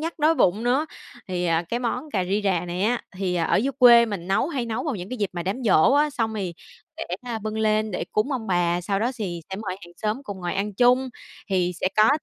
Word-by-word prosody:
nhắc 330 +1 -4
đói 310 +2 +4
bụng 210 - +2
nữa. 265 +6 +2 0.4
Thì, 180 -1 -2
à, 165 0 +2
cái 240 - -1
món 250 +5 -3
cà 185 -3 0
ri 200 +3 0
rà 180 -3 +1
này 175 +2 -3
á, 235 +3 +1
thì 185 -2 -1
ở 165 -2 +1
dưới 265 +7 +1
quê 235 -2 +8
mình 190 -4 -5
nấu 195 +10 +1
hay 260 -7 -2
nấu 225 -1 -2
vào 295 - -1
những 180 +4 -8
dịp 200 - 0
mà 175 -1 -4
đám 200 +8 -3
giỗ 215 +4 +5
á, 295 +1 +3
xong 225 -5 -2
thì 185 -5 -3 0.4
để, - - -4 0.2
a, 240 -3 -4
bưng 215 +1 -4
lên 215 0 +1
để 180 - -3
cúng 240 +7 +1
ông 235 -4 -3
bà. 175 -1 +1
Sau 195 +2 -1
đó 240 +4 0
sì 185 -8 -4
sẽ 190 - -4
mời 200 -3 -4
hàng 175 - -15
xóm 220 +6 -2
cùng 200 -7 -7
ngồi 175 -1 -3
ăn 200 +1 -2
chung, 250 +3 +4 0.4
thì 180 -2 +1
sẽ - - +1
có 215 +1 +6
215 Hz, 255 wpm, -24 LUFS, 185-245 Hz, 0.4 s, quê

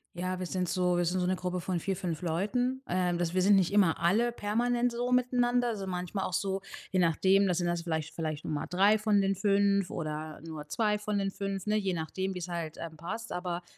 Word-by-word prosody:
Ja, 185 +1 -2
wir 185 - -3
sind 180 0 -2
so 180 -1 +1
wir 175 0 +1
sind 180 +2 0
so - - +1
'ne 185 +1 +1
Gruppe 180 0 -3
von 180 0 -2
4, 195 +3 -2
5 175 -3 -3
Leuten. 230 +10 -1
Ähm, 180 -1 +1
das 170 -1 -1
wir 185 - +2
sind 200 +2 +6
nicht 190 0 +2
immer 190 -6 +4
alle 210 +9 +3
permanent 240 +3 0
so 245 +1 -2
miteinander, 245 -1 +2
also 200 -4 -4
manchmal 180 +2 -3
auch - - -4
so, 195 +1 -1 0.3
je 185 - +2
nachdem, 190 +4 +4
da 180 - +1
sind 175 - 0
das 175 0 0
vielleicht 160 -2 -3
vielleicht 155 -2 -3
nur - - -2
mal 145 - -2
3 200 +4 +4
von 210 -1 +3
den 195 0 +2
5 200 -1 +2
oder 155 -1 -5
nur 155 -2 -7
2 210 +4 +1
von 210 0 -2
den 195 -1 0
5, 195 -1 -4
ne, 210 0 +2
je 195 -3 0
nachdem, 190 +4 -3
wie - - -3
es 175 - -5
halt, 170 -3 -4
ähm, 165 -1 -6
passt, 185 +8 -6
aber 180 -1 -3
185 Hz, 240 wpm, -30 LUFS, 175-205 Hz, 0.3 s, sind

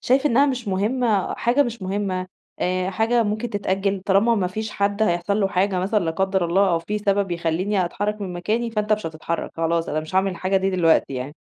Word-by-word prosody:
شايف 265 +3 +2
إنها 275 +3 +4
مش 250 -5 -2
مهمة، 210 +1 0
حاجة 245 +5 +2
مش 235 -5 -5
مهمة، 185 -1 -2 0.3
آآ 185 +1 0
حاجة 230 +4 +2
ممكن 215 +2 -2
تتأجل، 195 -1 -1
طالما 205 +4 +4
ما 190 -4 0
فيش 215 +4 -4
حد 200 +1 0
هيحصل 175 +2 +1
له 195 - +2
حاجة 190 0 +1
مثلًا 200 +2 0
لا 165 - 0
قدر 190 +1 0
الله 190 +3 +3
أو 165 - +2
في 210 +5 -3
سبب 200 -2 0
يخلّيني 175 +3 0
أتحرّك 205 +4 -3
من 190 -3 -4
مكاني، 220 +7 -1
فأنت 215 -1 0
مش 210 -5 0
هتتحرّك، 160 +1 -4
خلاص، 165 0 0
أنا 155 - -1
مش 155 +4 -9
هاعمل 190 +1 +3
الحاجة 185 +2 -1
دي 190 0 +1
دلوقتي 165 -6 +2
يعني، 130 +4 -5
195 Hz, 210 wpm, -22 LUFS, 180-215 Hz, 0.3 s, إنها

